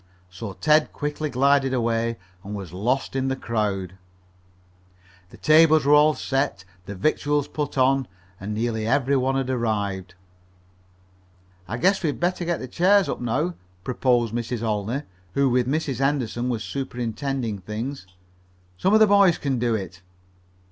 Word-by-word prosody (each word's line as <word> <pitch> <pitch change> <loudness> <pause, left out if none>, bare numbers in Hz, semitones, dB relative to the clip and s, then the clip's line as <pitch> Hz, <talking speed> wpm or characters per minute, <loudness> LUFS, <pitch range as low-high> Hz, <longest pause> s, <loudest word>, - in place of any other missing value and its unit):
So 95 +2 -7
Ted 150 - +2
quickly 150 +1 -3
glided 135 0 +2
away 115 -1 0 0.3
and 105 +2 -6
was 95 -5 -7
lost 125 +9 -1
in 135 0 0
the 135 - 0
crowd. 100 -7 -3 1.3
The - - -15
tables 155 -1 +5
were 145 - +5
all 150 +1 +5
set, 135 -9 -2 0.2
the 100 - -6
victuals 145 +6 0
put 145 -2 -4
on, 135 0 +3 0.3
and 100 +2 -5
nearly 110 -1 -1
every 140 +2 +2
one 135 0 +1
had 135 -1 -1
arrived. 100 -6 -2 1.5
"I 115 +6 -4
guess 190 +10 +2
we'd 155 -5 -2
better 175 +1 0
get 170 0 0
the 130 - -6
chairs 190 +8 +3
up - - -4
now," 135 +9 -1 0.3
proposed 120 -2 +1
Mrs. 120 0 -3
Olney, 110 +5 -2 0.3
who 140 -2 +3
with 125 0 +2
Mrs. 140 -3 -1
Henderson 130 -3 0
was 115 -3 -2
superintending 125 -3 -3
things. 110 +5 -6 0.7
"Some 195 +3 +3
of - - +6
the 220 - +8
boys 200 -4 +5
can 135 -4 -1
do 120 -1 +1
it." 95 -3 -6
130 Hz, 150 wpm, -24 LUFS, 110-145 Hz, 1.5 s, the